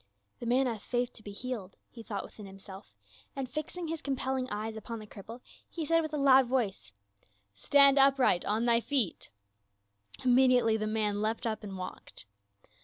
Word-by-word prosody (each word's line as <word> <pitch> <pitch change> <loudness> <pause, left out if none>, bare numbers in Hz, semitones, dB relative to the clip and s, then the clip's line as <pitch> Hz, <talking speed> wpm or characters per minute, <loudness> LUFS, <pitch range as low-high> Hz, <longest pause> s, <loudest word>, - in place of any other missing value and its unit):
"The 240 - -5
man 255 +3 +3
hath 230 -5 -3
faith 245 0 -2
to - - -11
be 205 - -9
healed," 210 -3 -6 0.2
he 235 - -10
thought 205 -3 -5
within 210 -2 -11
himself, 195 - -12 0.4
and 270 -2 -3
fixing 310 +5 -5
his 325 0 -4
compelling 265 -2 -2
eyes 215 +2 -4
upon 225 +2 -6
the 215 - -9
cripple, 225 +4 -11 0.3
he 330 -3 -4
said 330 +2 +3
with 310 -1 -4
a 300 - -2
loud 270 -2 +6
voice, 230 - -1 0.3
" - - -38 0.2
Stand 275 - +5
upright 270 -9 +4
on 220 +3 0
thy 235 -1 +4
feet 250 -8 -1 0.5
!" 100 0 -20
Immediately 250 -3 +4
the 215 0 -2
man 210 -1 0
leapt 220 +3 -1
up 220 -1 -2
and 195 -2 -6
walked. 185 -11 -7
230 Hz, 180 wpm, -30 LUFS, 205-265 Hz, 0.5 s, loud